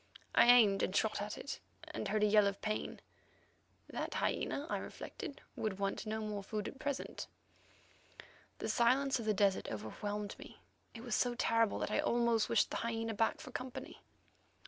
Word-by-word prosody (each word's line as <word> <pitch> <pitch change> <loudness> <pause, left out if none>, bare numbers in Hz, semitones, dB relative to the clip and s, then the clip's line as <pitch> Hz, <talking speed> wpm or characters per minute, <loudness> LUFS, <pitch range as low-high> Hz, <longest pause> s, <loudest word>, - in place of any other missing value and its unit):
I - - +6
aimed 220 -5 +7
and 185 - 0
shot 215 -1 +2
at 210 +1 -4
it, 285 - -5 0.2
and - - -5
heard 215 0 +1
a - - +7
yell 210 -1 +5
of 200 0 -2
pain. 215 0 -2 0.9
That - - -4
hyena, 285 - 0
I - - -1
reflected, 280 - -7
would 210 -3 -2
want 195 +2 -2
no 220 +1 -2
more 210 -1 -3
food 210 +1 -3
at 265 - -8
present. 280 -1 -3 1.3
The - - -3
silence 265 +3 +3
of 230 - -4
the 215 - +3
desert 195 -1 +2
overwhelmed 205 - -4
me; - - -11 0.4
it 230 - -8
was 240 -3 -3
so 245 +1 +2
terrible 230 -2 +2
that - - -2
I - - +2
almost 235 -2 +2
wished 230 -2 +3
the - - -1
hyena 225 -1 -2
back 225 +2 +1
for 255 - -9
company. 255 0 -6
220 Hz, 175 wpm, -35 LUFS, 205-240 Hz, 1.3 s, aimed